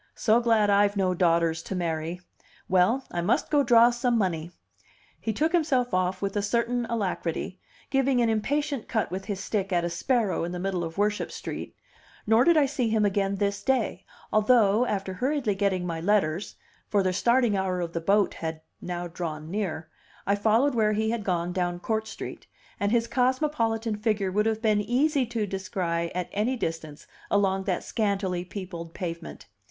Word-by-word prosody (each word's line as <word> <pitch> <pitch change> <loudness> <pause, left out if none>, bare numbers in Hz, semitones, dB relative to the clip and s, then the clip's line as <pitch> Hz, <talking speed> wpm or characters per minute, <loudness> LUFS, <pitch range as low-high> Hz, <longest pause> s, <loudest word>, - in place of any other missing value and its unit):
"So 220 +1 +3
glad 225 -3 +3
I've 200 0 +3
no 185 -2 +2
daughters 170 -2 +2
to 190 - -5
marry! 165 0 -2 0.5
Well 190 +9 +3
I 175 - -2
must 205 - 0
go 295 -2 +4
draw 235 -2 +6
some 240 0 +1
money." 170 -6 -1 0.7
He 225 - -2
took 305 +9 0
himself 270 - +1
off 185 +1 0
with 195 0 -2
a 205 - +1
certain 235 +3 0
alacrity, 185 -5 -3 0.3
giving 270 -1 +2
an 235 - +3
impatient 275 +4 -1
cut 220 - -1
with 190 +1 -4
his 200 -3 -4
stick 195 0 -2
at 175 -1 +2
a 170 - -2
sparrow 215 +3 0
in 175 +1 -3
the 180 - -4
middle 185 -1 -1
of 165 +1 -6
Worship 210 +1 0
Street, - - -6 0.5
nor 225 +2 +5
did 340 +1 +5
I 295 - +5
see 255 -4 -1
him 220 -1 +2
again 200 0 +1
this 200 0 -1
day, 250 -8 0 0.3
although, 215 +1 +4
after 195 -2 -2
hurriedly 255 +1 0
getting 190 -2 0
my 165 -2 -3
letters 185 -2 +1 0.3
(for 200 -2 +2
the 185 -1 +1
starting 235 +2 +3
hour 190 -1 -1
of 170 -1 -3
the 170 - -2
boat 200 +4 +2
had 160 -1 -5 0.2
now 175 0 -4
drawn 160 -2 -5
near), 175 -6 -3 0.4
I 200 - +2
followed 225 +7 +3
where 215 -2 +2
he 220 +1 0
had 230 -2 -2
gone 180 -2 -1
down 175 -1 -1
Court 220 +3 -2
Street, - - -8 0.3
and 200 0 0
his 230 -1 +2
cosmopolitan 235 -3 0
figure 210 -3 0
would 210 +3 +1
have 220 0 -1
been 210 -2 +3
easy 260 +5 +1
to 230 -2 -2
descry 185 -4 -2
at 180 -1 -2
any 220 +6 0
distance 160 -6 -5 0.2
along 195 -1 +1
that 185 -3 -1
scantily 195 -5 -1
peopled 175 -3 -7
pavement. 170 -2 -6
205 Hz, 180 wpm, -26 LUFS, 180-230 Hz, 0.7 s, draw